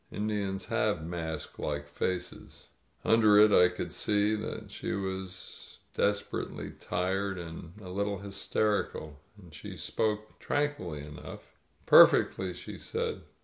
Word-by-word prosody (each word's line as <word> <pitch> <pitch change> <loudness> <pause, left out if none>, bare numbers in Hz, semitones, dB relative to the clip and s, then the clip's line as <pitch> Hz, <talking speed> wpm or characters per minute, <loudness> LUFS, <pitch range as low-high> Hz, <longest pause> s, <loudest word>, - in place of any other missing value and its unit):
Indians 100 -2 -2
have 80 - 0
mask 80 -3 -5
like 75 -1 -3
faces. 90 +3 -4 0.4
Under 110 -2 +6
it 105 0 +8
I 90 -2 +7
could - - -5
see 105 0 +1
that 105 - -5
she - - -4
was. 95 -1 -5 0.2
desperately 105 0 -1
tired 95 +2 -2
and 85 -1 -8
even 105 -2 -13
a - - -7
little 100 +1 -1
hysterical. 100 -5 -1 0.2
But 90 -6 -15
she - - -8
spoke 110 0 -2
tranquilly 120 - -2
enough. 75 0 -10 0.3
"Perfectly," 95 -1 +6
she - - -8
said. - - -2
95 Hz, 125 wpm, -30 LUFS, 85-105 Hz, 0.4 s, it